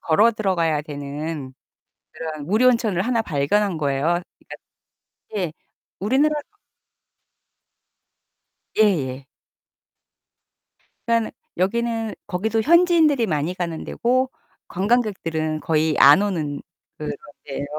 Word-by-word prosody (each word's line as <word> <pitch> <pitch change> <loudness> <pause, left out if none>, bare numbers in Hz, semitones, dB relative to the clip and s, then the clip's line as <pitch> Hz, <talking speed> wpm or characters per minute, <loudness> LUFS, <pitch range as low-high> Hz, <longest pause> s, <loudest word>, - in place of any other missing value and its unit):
걸어 210 +8 +4
들어가야 170 -8 0
되는 145 -1 -6 0.6
그런 155 -2 -6
무료 220 +6 +3
온천을 220 -7 +1
하나 235 0 +1
발견한 175 +3 0
거예요. 140 -2 -1 0.4
그러니까 - - -11 0.8
예. 175 -5 -1 0.5
우리나라 285 +9 +2 2.4
예예. 140 -11 +1 1.8
그니깐 230 -1 +1 0.3
여기는 225 +3 -1
거기도 220 +4 0
현지인들이 325 -4 +4
많이 155 -1 -1
가는 170 -3 -4
데고 255 +2 0 0.4
관광객들은 180 -7 0
거의 155 -1 +1
안 145 +7 +8
오는 160 -8 -2 0.4
그런 150 - -4 0.3
데예요. 140 0 -4
185 Hz, 235 characters per minute, -22 LUFS, 155-230 Hz, 2.4 s, 안